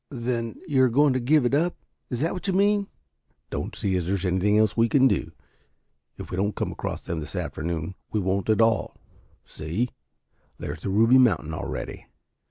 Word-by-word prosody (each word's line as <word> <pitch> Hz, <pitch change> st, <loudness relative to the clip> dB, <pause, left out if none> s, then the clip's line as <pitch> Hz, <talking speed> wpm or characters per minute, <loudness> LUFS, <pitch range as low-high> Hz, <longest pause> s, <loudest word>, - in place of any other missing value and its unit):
"Then 120 Hz, -3 st, -3 dB
you 140 Hz, -4 st, +3 dB
are 130 Hz, -, +5 dB
going 140 Hz, +3 st, +4 dB
to 130 Hz, -, 0 dB
give 135 Hz, +2 st, +3 dB
it 120 Hz, -, +1 dB
up? 170 Hz, +5 st, +2 dB, 0.3 s
Is 125 Hz, -1 st, -3 dB
that 165 Hz, -, +1 dB
what 185 Hz, +1 st, -5 dB
you 190 Hz, -, +1 dB
mean?" 200 Hz, +1 st, +2 dB, 0.6 s
"Don't -, -, -4 dB
see 95 Hz, -2 st, -1 dB
as 90 Hz, -2 st, -1 dB
there 95 Hz, -, +1 dB
is 95 Hz, 0 st, -3 dB
anything 95 Hz, +3 st, +2 dB
else 110 Hz, -2 st, +3 dB
we 115 Hz, 0 st, +3 dB
can 135 Hz, +1 st, +5 dB
do. -, -, 0 dB, 0.9 s
If -, -, -8 dB
we 90 Hz, -, -3 dB
don't 100 Hz, +2 st, 0 dB
come -, -, -2 dB
across -, -, -5 dB
them 85 Hz, -2 st, -4 dB
this 75 Hz, -1 st, -7 dB
afternoon, 80 Hz, +2 st, -3 dB, 0.2 s
we 110 Hz, -, 0 dB
won't 95 Hz, +2 st, -1 dB
at 110 Hz, +1 st, +4 dB
all. 110 Hz, -6 st, +2 dB, 0.5 s
See, 90 Hz, +11 st, -3 dB, 0.7 s
there's 75 Hz, +2 st, -6 dB
the -, -, -3 dB
Ruby 115 Hz, +6 st, +5 dB
Mountain 85 Hz, -11 st, +2 dB
already." -, -, -5 dB
115 Hz, 195 wpm, -25 LUFS, 95-130 Hz, 0.9 s, are